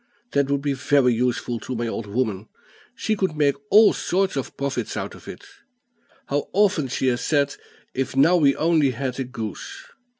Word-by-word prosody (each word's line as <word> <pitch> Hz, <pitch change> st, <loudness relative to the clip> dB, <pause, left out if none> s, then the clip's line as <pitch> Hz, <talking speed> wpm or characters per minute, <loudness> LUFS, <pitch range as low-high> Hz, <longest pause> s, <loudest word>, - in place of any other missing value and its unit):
That 140 Hz, -1 st, +1 dB
would 140 Hz, 0 st, 0 dB
be 145 Hz, -1 st, 0 dB
very 135 Hz, -2 st, +3 dB
useful 120 Hz, 0 st, -1 dB
to 130 Hz, -, -5 dB
my 120 Hz, 0 st, -2 dB
old 115 Hz, -1 st, -4 dB
woman; 105 Hz, -2 st, -2 dB, 0.5 s
she 220 Hz, -, -1 dB
could 190 Hz, -6 st, -1 dB
make 145 Hz, -2 st, +3 dB, 0.2 s
all 215 Hz, +1 st, +7 dB
sorts 190 Hz, -1 st, 0 dB
of 135 Hz, -, -4 dB
profits 140 Hz, -1 st, -3 dB
out -, -, -4 dB
of -, -, -14 dB
it. -, -, -9 dB, 0.8 s
How 145 Hz, +1 st, -2 dB
often 195 Hz, -8 st, +2 dB
she 130 Hz, -, -2 dB
has 120 Hz, 0 st, -1 dB
said, 145 Hz, -2 st, +1 dB, 0.4 s
'If 130 Hz, 0 st, -3 dB
now 150 Hz, +7 st, +5 dB
we 145 Hz, -5 st, +4 dB
only 160 Hz, -3 st, +3 dB
had 130 Hz, +1 st, -4 dB
a -, -, 0 dB
goose!' 130 Hz, -, -7 dB
140 Hz, 185 wpm, -23 LUFS, 125-155 Hz, 0.8 s, all